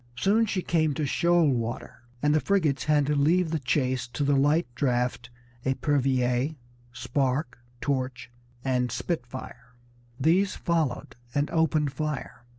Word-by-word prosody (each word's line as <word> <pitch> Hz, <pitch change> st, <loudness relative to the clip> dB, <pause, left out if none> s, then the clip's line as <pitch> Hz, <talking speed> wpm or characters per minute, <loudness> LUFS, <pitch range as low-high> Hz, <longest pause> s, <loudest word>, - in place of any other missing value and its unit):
Soon 215 Hz, -, +3 dB
she 190 Hz, -3 st, -1 dB
came 155 Hz, -4 st, +1 dB
to 155 Hz, -, -1 dB
shoal 170 Hz, +3 st, +3 dB
water, 120 Hz, -2 st, -3 dB, 0.2 s
and 150 Hz, 0 st, +4 dB
the 155 Hz, -, +4 dB
frigates 155 Hz, -8 st, +1 dB
had 150 Hz, -1 st, +3 dB
to 150 Hz, -, 0 dB
leave 160 Hz, +4 st, +2 dB
the 160 Hz, -, 0 dB
chase 130 Hz, -1 st, 0 dB
to 130 Hz, +4 st, -3 dB
the 140 Hz, 0 st, +3 dB
light 145 Hz, +5 st, +3 dB
draught 125 Hz, -2 st, -1 dB, 0.3 s
Epervier, 130 Hz, 0 st, +1 dB, 0.4 s
Spark, 130 Hz, +2 st, -1 dB, 0.2 s
Torch, 130 Hz, -3 st, -2 dB, 0.3 s
and 125 Hz, -2 st, +1 dB
Spitfire. 125 Hz, -4 st, -5 dB, 0.4 s
These 180 Hz, +7 st, +3 dB
followed 160 Hz, -9 st, -1 dB, 0.2 s
and 145 Hz, +1 st, 0 dB
opened 155 Hz, -3 st, +1 dB
fire. 150 Hz, -4 st, -4 dB
140 Hz, 135 wpm, -27 LUFS, 125-160 Hz, 0.4 s, and